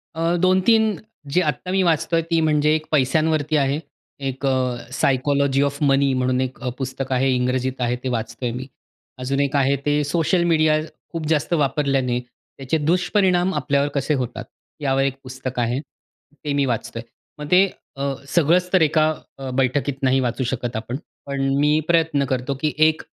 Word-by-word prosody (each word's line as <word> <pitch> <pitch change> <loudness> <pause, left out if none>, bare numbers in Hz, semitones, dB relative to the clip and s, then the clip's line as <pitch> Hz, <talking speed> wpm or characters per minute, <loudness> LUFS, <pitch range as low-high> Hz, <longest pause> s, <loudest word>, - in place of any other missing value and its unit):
अ, 165 +1 +1
2-3 200 +4 +3 0.3
जी 175 +6 +2
आत्ता 155 +3 -2
मी 190 0 +2
वाचतो 165 -1 +1
आहे. 165 - +2
ती 165 - +3
म्हणजे 150 -1 +3
एक 155 0 -3
पैशांवरती 155 +2 +2
आहे. 140 +1 +1 0.4
एक 135 0 -4
अ, 130 -2 +1 0.2
सायकॉलॉजी 140 +1 +1
ऑफ 140 +1 -1
मनी 135 -1 +3
म्हणून 130 0 +1
एक 130 0 -4
अ, 125 - -1
पुस्तक 130 0 -4
आहे 130 +1 +2
इंग्रजीत 125 +1 -1
आहे. 120 0 +1
ते 130 - -1
वाचतो 115 +1 -4
आहे 120 - -1
मी. 130 +1 -6 0.5
अजून 135 +2 -1
एक 140 0 -1
आहे 140 0 +3
ते 145 0 +2
सोशल 170 +4 +1
मीडिया 155 -2 +3 0.3
खूप 165 -2 -4
जास्त 160 +2 +1
वापरल्याने 135 -4 +1
त्याचे 135 +4 -5
दुष्परिणाम 180 +3 +2
आपल्यावर 140 -1 +1
कसे 140 +2 0
होतात, 125 -2 -3 0.4
यावर 135 -1 +1
एक 135 -1 0
पुस्तक 130 -1 -6
आहे. 120 +2 0 0.7
ते 145 - -1
मी 140 -1 +2
वाचतो 115 -1 -3
आहे. 115 - -10 0.3
मग 150 0 -7
ते 185 +2 +7 0.3
अ, 140 0 -1
सगळंच 175 +3 +2
तर 185 - +5
एका 155 0 +3 0.3
अ, 135 -1 -6
बैठकीत 135 +1 0
नाही 130 0 +3
वाचू 125 +1 -1
शकत 120 -1 -4
आपण. 115 +3 -4 0.3
पण 140 -1 -3 0.2
मी 150 +1 +3
प्रयत्न 160 -4 +2
करतो 130 +1 -2
की 155 -1 0
एक 160 0 0
140 Hz, 175 wpm, -22 LUFS, 130-155 Hz, 0.7 s, ते